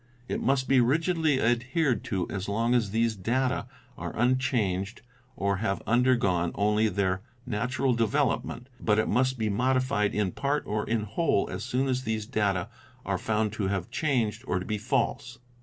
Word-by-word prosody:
It - - -2
must 135 -1 +1
be 135 -2 +5
rigidly 160 +2 +2
adhered 125 +4 +1
to 95 -4 -1
as 95 0 -4
long 115 +4 +1
as 115 -5 +2
these 115 +1 +1
data 125 +6 0 0.3
are - - -5
unchanged 115 -5 0 0.3
or 100 0 0
have 100 -1 -2
under 125 +2 +4
gone 90 -7 +1
only 105 +1 +2
their 95 -1 0 0.2
natural 125 +3 0
development, 115 +1 0
but 105 -2 +2
it 110 - +2
must 130 +3 +1
be 110 -2 0
modified 125 0 +1
in 105 -3 +1
part 145 +6 -1
or 105 +1 -2
in 115 -1 +1
whole 110 - +1
as - - -4
soon 130 +3 0
as 130 -1 0
these 110 -2 -2
data 100 -4 0 0.4
are 95 -2 -1
found 110 -1 0
to 105 -4 -1
have 95 -3 -2
changed 120 -7 0
or 90 - +1
to 90 - -4
be 105 -2 -2
false. 120 +1 -1
115 Hz, 175 wpm, -28 LUFS, 105-130 Hz, 0.4 s, be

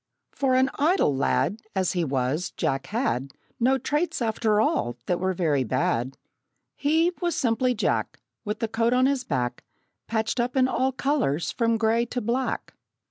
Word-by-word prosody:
For 265 -2 +1
an 260 +1 +3
idle 305 - +3
lad, 140 - 0
As 190 -2 +1
he 175 -2 0
was, 140 +4 -1
Jack 135 0 -1
had 140 - -1 0.3
No 260 +3 +3
traits, 300 +6 -1
after 220 -2 +1
all, 120 - +1
that 180 - 0
were 185 0 0
very 150 -6 +1
bad. 125 +2 -1 0.6
He, 320 +4 +2
was 345 -1 0
simply 250 +1 +1
Jack, 215 - -1 0.2
With 210 +1 -4
the 225 - +1
coat 230 +2 +1
on 255 +1 +4
his 270 -1 +1
back 125 - -2 0.4
Patched 220 +2 -1
up 245 +2 0
in 255 -1 +4
all 260 0 +1
colors 255 - 0
from 230 -1 +1
gray 230 +1 +2
to 245 - -3
black. 245 +4 -2
225 Hz, 165 wpm, -25 LUFS, 165-260 Hz, 0.6 s, on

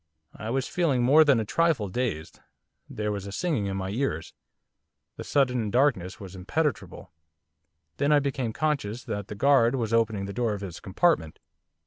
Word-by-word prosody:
I 110 - -6
was 130 +2 -1
feeling 145 -9 +1
more 145 +6 +7
than 140 -6 +4
a 110 - -2
trifle 160 -4 +1
dazed, 95 -7 -3 0.5
there 105 0 -3
was 100 -1 -5
a - - -6
singing 135 - -1
in 95 0 -3
my 95 0 -3
ears, 110 - -2 0.8
the - - -7
sudden 125 -6 +1
darkness 120 -7 +1
was 95 -2 -9
impenetrable. 115 - -3 0.9
Then 145 +1 +1
I 150 - +6
became 135 -4 -1
conscious 125 -5 -2
that 100 -1 -5
the 105 - -7
guard 135 +1 +4
was 115 -3 -2
opening 110 -3 +1
the 100 - -6
door 115 -2 0
of 100 - -8
his 90 -4 -7
compartment. 95 - +1
115 Hz, 170 wpm, -26 LUFS, 100-140 Hz, 0.9 s, more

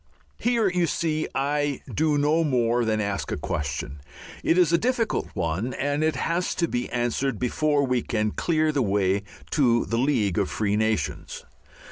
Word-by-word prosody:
Here, 235 -3 +2
you 180 -2 +1
see, 155 0 -1
I 145 0 0
do 155 -1 +2
no 150 +3 +2
more 120 -4 +1
than 110 -1 +1
ask 100 -1 -2
a - - -1
question. 75 -3 -4 0.4
It 165 - +3
is 175 -2 +4
a 170 - +5
difficult 240 0 0
one, 90 +10 -2
and 145 +2 -1
it 160 -2 +1
has 170 +7 -1
to 170 - +1
be 120 -4 -2
answered 120 +1 -1
before 145 +4 +1
we 125 -2 +1
can 110 -2 -1
clear 155 +2 +1
the 145 -2 0
way 100 -2 +1 0.3
to 120 -5 +3
the 115 - -1
League 110 -9 +1
of 100 - 0
Free 105 -1 0
Nations. 110 0 -2
130 Hz, 170 wpm, -25 LUFS, 110-155 Hz, 0.4 s, a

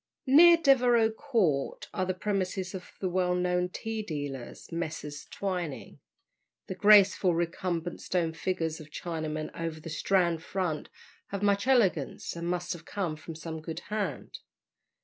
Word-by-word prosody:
Near 335 +6 +8
Devereux 245 -7 +4
Court 220 - 0
are 185 -3 -1
the 185 - -1
premises 190 -1 -2
of 185 -1 -8
the 190 - -1
well 180 0 +1
known 180 0 +1
tea 220 +4 -4
dealers, 145 - -6
Messrs. 160 -3 -5
Twining. 180 -7 -4 0.7
The - - -5
graceful 195 -2 +6
recumbent 170 0 -2
stone 170 -3 0
figures 165 -2 -2
of 155 -1 -11
Chinamen 155 -1 -4
over 165 -1 -4
the 160 +1 -8
Strand 170 0 +1
front 180 -4 -3 0.4
have 200 0 -4
much 200 +3 +2
elegance, 195 - +2
and 170 0 -4
must 175 0 -1
have 170 -2 -10
come 175 -4 -3
from 160 +1 -9
some 160 0 -6
good 165 +1 -6
hand. 210 -1 -3
180 Hz, 145 wpm, -29 LUFS, 160-200 Hz, 0.7 s, Near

